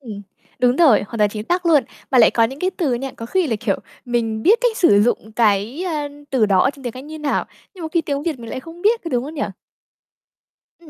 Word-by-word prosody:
Ừm. 215 Hz, -6 st, -8 dB, 0.4 s
Đúng 250 Hz, 0 st, +3 dB
rồi, 290 Hz, -11 st, +5 dB
hoàn 225 Hz, +3 st, -7 dB
toàn 210 Hz, -1 st, +3 dB
chính 210 Hz, 0 st, -6 dB
xác 355 Hz, 0 st, 0 dB
luôn. 310 Hz, -5 st, +4 dB, 0.3 s
Mà 260 Hz, -, +4 dB
lại 230 Hz, -, +7 dB
có 230 Hz, -, +3 dB
những 265 Hz, +4 st, -4 dB
cái 370 Hz, +1 st, +1 dB
từ 325 Hz, -9 st, -1 dB
nha, 265 Hz, +2 st, -4 dB
có 230 Hz, -, -7 dB
khi 370 Hz, +6 st, +1 dB
là, 225 Hz, -5 st, -1 dB
kiểu, 200 Hz, -5 st, 0 dB, 0.3 s
mình 225 Hz, -3 st, -1 dB
biết 430 Hz, -, +5 dB
cách 485 Hz, -3 st, +1 dB
sử 205 Hz, -, +5 dB
dụng 220 Hz, -1 st, -1 dB
cái, 220 Hz, -, +1 dB
à, 300 Hz, -4 st, -2 dB, 0.2 s
từ 240 Hz, -5 st, +3 dB
đó 190 Hz, -2 st, +3 dB
ở -, -, +3 dB
trong 280 Hz, -1 st, -16 dB
tiếng 245 Hz, -, -3 dB
Anh 260 Hz, +2 st, -9 dB
như 310 Hz, +1 st, -8 dB
nào, 300 Hz, -2 st, -1 dB, 0.3 s
nhưng 360 Hz, -, -10 dB
một 320 Hz, -, -3 dB
khi 340 Hz, -, +3 dB
tiếng 285 Hz, -3 st, -3 dB
Việt 310 Hz, -4 st, -2 dB
mình 230 Hz, -1 st, -8 dB
lại 260 Hz, -, -4 dB
không 335 Hz, +3 st, -12 dB
biết, 450 Hz, +3 st, +3 dB
có 335 Hz, -, -3 dB
đúng 245 Hz, +1 st, 0 dB
không 305 Hz, -, -8 dB
nhỉ? 285 Hz, -, -3 dB, 1.4 s
Ừm. 335 Hz, -2 st, -17 dB
265 Hz, 265 wpm, -20 LUFS, 225-330 Hz, 1.4 s, lại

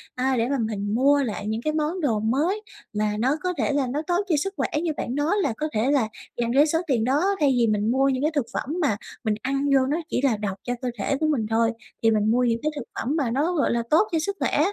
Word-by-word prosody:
a, 260 Hz, 0 st, +1 dB
để 230 Hz, +3 st, +1 dB
mà 280 Hz, -, +1 dB
mình 220 Hz, -4 st, -2 dB
mua 280 Hz, +3 st, +4 dB
lại 210 Hz, -3 st, -4 dB
những 220 Hz, +2 st, -2 dB
cái 305 Hz, +3 st, -1 dB
món 315 Hz, +4 st, -1 dB
đồ 235 Hz, -8 st, +1 dB
mới 295 Hz, -, 0 dB, 0.3 s
mà 210 Hz, 0 st, 0 dB
nó 260 Hz, +6 st, +2 dB
có 365 Hz, -, 0 dB
thể 250 Hz, +2 st, 0 dB
là 275 Hz, -3 st, +1 dB
nó 285 Hz, +5 st, -2 dB
tốt 355 Hz, +3 st, +1 dB
cho 330 Hz, -, +3 dB
sức 390 Hz, +7 st, -2 dB
khỏe, -, -, 0 dB, 0.2 s
như 335 Hz, -, 0 dB
bạn 245 Hz, -, -3 dB
nói 295 Hz, +7 st, +1 dB
là 265 Hz, -, 0 dB
có 310 Hz, -, -1 dB
thể 225 Hz, +6 st, +1 dB
là 270 Hz, -6 st, +2 dB, 0.3 s
dành 235 Hz, -1 st, 0 dB
cái 285 Hz, +3 st, +6 dB
số 325 Hz, +2 st, +1 dB
tiền 240 Hz, -5 st, +1 dB
đó, 300 Hz, -, +2 dB
thay 290 Hz, -3 st, +4 dB
vì 235 Hz, -, +3 dB
mình 210 Hz, +1 st, +1 dB
mua 270 Hz, +2 st, +3 dB
những 265 Hz, +1 st, -1 dB
cái 310 Hz, -, +2 dB
thực 285 Hz, -5 st, +1 dB
phẩm 295 Hz, +5 st, -3 dB
mà 245 Hz, -9 st, +1 dB, 0.3 s
mình 215 Hz, -2 st, +1 dB
ăn 275 Hz, +2 st, 0 dB
vô 260 Hz, -1 st, +4 dB
nó 295 Hz, +4 st, 0 dB
chỉ -, -, 0 dB
là 250 Hz, -6 st, +2 dB
độc 200 Hz, -2 st, -3 dB
cho 245 Hz, -, -2 dB
cơ 250 Hz, -, -1 dB
thể 275 Hz, -, 0 dB
của 310 Hz, -, +1 dB
mình 270 Hz, -8 st, +1 dB
thôi, 225 Hz, +1 st, +2 dB, 0.3 s
thì 225 Hz, -, +5 dB
mình 215 Hz, 0 st, +2 dB
mua 250 Hz, +2 st, +3 dB
những 230 Hz, -1 st, +1 dB
cái 305 Hz, -, +1 dB
thực 285 Hz, -, -4 dB, 0.2 s
phẩm 275 Hz, +6 st, -1 dB
mà 275 Hz, -7 st, 0 dB
nó, 295 Hz, +8 st, +1 dB
gọi 310 Hz, -, +1 dB
là, 235 Hz, 0 st, 0 dB
tốt 330 Hz, +7 st, +4 dB
cho 325 Hz, -, +1 dB
sức 395 Hz, +5 st, -2 dB
khỏe, -, -, +1 dB
265 Hz, 285 wpm, -24 LUFS, 230-300 Hz, 0.3 s, cái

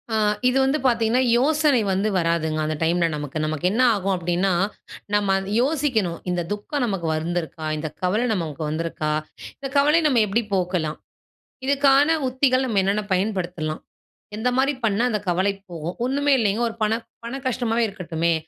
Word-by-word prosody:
ஆ -, -, +2 dB, 0.3 s
இது 250 Hz, +1 st, +2 dB
வந்து 270 Hz, +3 st, +1 dB
பார்த்தீங்கன்னா, 235 Hz, 0 st, +3 dB, 0.2 s
யோசனை 295 Hz, 0 st, +3 dB
வந்து 195 Hz, +3 st, +1 dB
வராதுங்க. 165 Hz, -2 st, 0 dB
அந்த 155 Hz, 0 st, -1 dB
டைம்‌ல 170 Hz, +1 st, +2 dB
நமக்கு. 150 Hz, 0 st, -5 dB
நமக்கு 155 Hz, +2 st, -3 dB
என்ன 230 Hz, +5 st, +1 dB
ஆகும் 195 Hz, -1 st, 0 dB
அப்பிடின்னா, 175 Hz, +2 st, 0 dB, 0.6 s
நம்ம 205 Hz, -2 st, +2 dB
அத 195 Hz, +1 st, -6 dB
யோசிக்கணும், 255 Hz, -, 0 dB
இந்த 180 Hz, -1 st, 0 dB
துக்கம் 210 Hz, +7 st, -2 dB
நமக்கு 195 Hz, -7 st, -2 dB
வந்துருக்கா? 160 Hz, -1 st, -3 dB
இந்த 155 Hz, +1 st, -3 dB
கவல 185 Hz, +5 st, +1 dB
நமக்கு 160 Hz, -6 st, -4 dB
வந்திருக்கா? 155 Hz, -1 st, -2 dB, 0.5 s
இந்த 270 Hz, 0 st, -6 dB
கவலைய 300 Hz, +4 st, +4 dB
நம்ம 255 Hz, -6 st, +3 dB
எப்பிடி 220 Hz, +3 st, 0 dB
போக்கலாம். 175 Hz, -4 st, -1 dB, 0.7 s
இதற்கான 280 Hz, +3 st, +4 dB
உத்திகள் 260 Hz, 0 st, +2 dB
நம்ம 220 Hz, -6 st, +1 dB
என்னென்ன 200 Hz, +2 st, 0 dB
பயன்படுத்தலாம். 180 Hz, -5 st, -2 dB, 0.5 s
எந்த 225 Hz, +4 st, 0 dB
மாரி 275 Hz, +2 st, +2 dB
பண்ணா 215 Hz, +1 st, +1 dB
அந்த 215 Hz, -3 st, 0 dB
கவலை 185 Hz, +3 st, +1 dB, 0.2 s
போகும். 170 Hz, +1 st, -5 dB
ஒன்னுமே 285 Hz, +2 st, +1 dB
இல்லேங்க, 215 Hz, +1 st, +1 dB
ஒரு 225 Hz, -, -9 dB
பண, 215 Hz, +1 st, +2 dB, 0.3 s
பண 240 Hz, +3 st, -4 dB
கஷ்டமாவே 235 Hz, -2 st, 0 dB
இருக்கட்டுமே! 170 Hz, -4 st, -1 dB
200 Hz, 155 wpm, -23 LUFS, 170-255 Hz, 0.7 s, கவலைய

